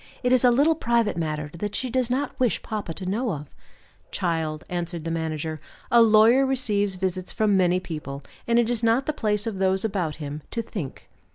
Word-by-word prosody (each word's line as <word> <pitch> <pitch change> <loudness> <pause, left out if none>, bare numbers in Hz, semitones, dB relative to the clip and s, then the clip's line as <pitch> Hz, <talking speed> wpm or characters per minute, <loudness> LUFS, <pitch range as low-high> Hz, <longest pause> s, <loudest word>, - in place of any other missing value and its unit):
It 250 - +2
is 255 - +4
a 250 - +7
little 285 +7 +4
private 235 - +1
matter 155 -3 -3
that 205 0 -3
she 255 -2 -2
does 255 -1 +1
not 265 +2 -1
wish 250 -4 +1
papa 210 -6 -4
to 185 +3 -6
know 215 +4 -1
of." 150 -1 -7 0.6
"Child," 160 -3 -2
answered 175 -2 -4
the 165 - -2
manager, 160 -1 -3 0.3
"a 235 - +7
lawyer 225 +4 +6
receives 210 -7 0
visits 185 0 -2
from 210 -2 +2
many 180 -1 +3
people; 150 -5 -6 0.2
and 235 0 +3
it 235 -1 +4
is 240 -2 0
not 230 +3 +3
the 305 - -1
place 210 -6 0
of 215 -4 -3
those 190 +1 +1
about 180 -8 -1
him 150 0 -6
to 230 - -2
'think. 180 - -7
200 Hz, 200 wpm, -25 LUFS, 165-235 Hz, 0.6 s, a